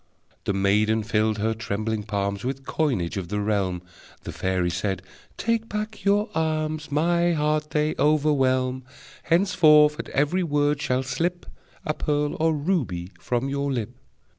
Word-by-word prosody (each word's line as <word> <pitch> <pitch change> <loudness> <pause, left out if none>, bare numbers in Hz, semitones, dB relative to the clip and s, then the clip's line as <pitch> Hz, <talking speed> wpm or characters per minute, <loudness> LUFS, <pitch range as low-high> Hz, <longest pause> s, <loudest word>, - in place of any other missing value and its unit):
The - - 0
maiden 105 +3 +2
filled 110 0 +1
her 110 +2 0
trembling 110 0 -3
palms 100 -1 -2
With 135 +1 -4
coinage 120 - -1
of 95 -3 -4
the 105 +2 -2
realm. 100 -4 -1 0.4
The - - -6
fairy 90 -2 -1
said: 90 +1 -2 0.3
"Take 230 -1 -1
back 215 +1 -4
your 205 +1 +3
alms! 155 -1 -1
My 170 +3 +2
heart 150 0 0
they 150 0 +1
overwhelm. 135 -3 +2 0.4
Henceforth 160 -4 +4
at - - -5
every 150 +7 +1
word 145 -3 +1
shall 130 -1 0
slip 175 +6 -2 0.4
A 155 - 0
pearl 150 -1 -1
or 160 +1 +3
ruby 140 - -1
from 125 +2 -1
your 140 0 -1
lip!" 115 -6 -2
140 Hz, 145 wpm, -25 LUFS, 105-155 Hz, 0.4 s, Henceforth